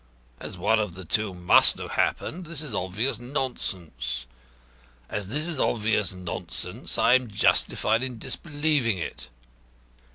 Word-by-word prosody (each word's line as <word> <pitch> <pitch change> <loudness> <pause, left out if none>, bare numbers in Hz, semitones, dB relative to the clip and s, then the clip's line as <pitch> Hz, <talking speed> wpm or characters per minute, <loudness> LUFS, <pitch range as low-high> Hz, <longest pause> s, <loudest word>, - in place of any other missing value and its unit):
As - - -6
one 105 +5 +3
of 105 -6 -2
the 95 -1 -8
two 105 +4 0
must 90 -1 +5
have - - -6
happened, 175 +1 -1
this 160 -2 -2
is 140 -7 -5
obvious 100 +9 -1
nonsense. 85 - -3 0.8
As 105 -2 -3
this 150 +9 0
is 165 -5 -2
obvious 110 -2 +1
nonsense 90 -2 -4
I 120 - +5
am 130 -2 +3
justified 110 +2 +2
in 130 -2 -3
disbelieving 145 - +1
it. 85 - -6
110 Hz, 135 wpm, -26 LUFS, 95-135 Hz, 0.8 s, must